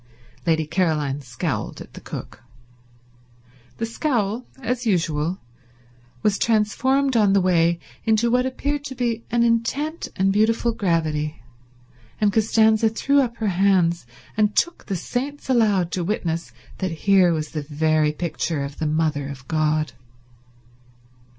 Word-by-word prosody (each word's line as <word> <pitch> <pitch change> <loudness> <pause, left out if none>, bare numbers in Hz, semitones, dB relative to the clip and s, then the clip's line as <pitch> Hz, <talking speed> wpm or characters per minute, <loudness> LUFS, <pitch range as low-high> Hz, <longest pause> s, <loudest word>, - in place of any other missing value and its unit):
Lady 160 -1 +2
Caroline 150 -4 0
scowled 125 -4 -4
at - - -11
the - - -10
cook. - - -8 1.4
The 230 - -1
scowl, 230 -2 -1
as 250 -1 -2
usual, 165 -3 0 0.9
was 210 -1 +2
transformed 260 +5 +2
on 210 -3 +4
the 200 - +5
way 170 -2 +3 0.3
into 225 +1 +2
what 250 +1 +2
appeared 285 +2 -2
to 265 -2 -6
be 235 -2 -1
an 235 0 +2
intent 240 +8 0
and 195 0 +2
beautiful 225 +3 +2
gravity, 160 - -1 0.8
and 205 -2 +2
Costanza 220 0 +4
threw 280 +6 +2
up 235 -3 -2
her 220 -2 0
hands 180 -5 +2 0.3
and 210 -1 +2
took 345 - 0
the 195 - -1
saints 265 - -3
aloud 205 -8 +3
to 180 - -1
witness 170 -3 -2 0.3
that 185 - -1 0.2
here 190 -3 +5
was 155 -2 -2
the 155 - -3
very 155 +1 +1
picture 155 -1 -2
of 140 +1 -7
the 155 - 0
Mother 155 -2 0
of 135 -2 -9
God. 155 -3 0
195 Hz, 135 wpm, -23 LUFS, 160-230 Hz, 1.4 s, the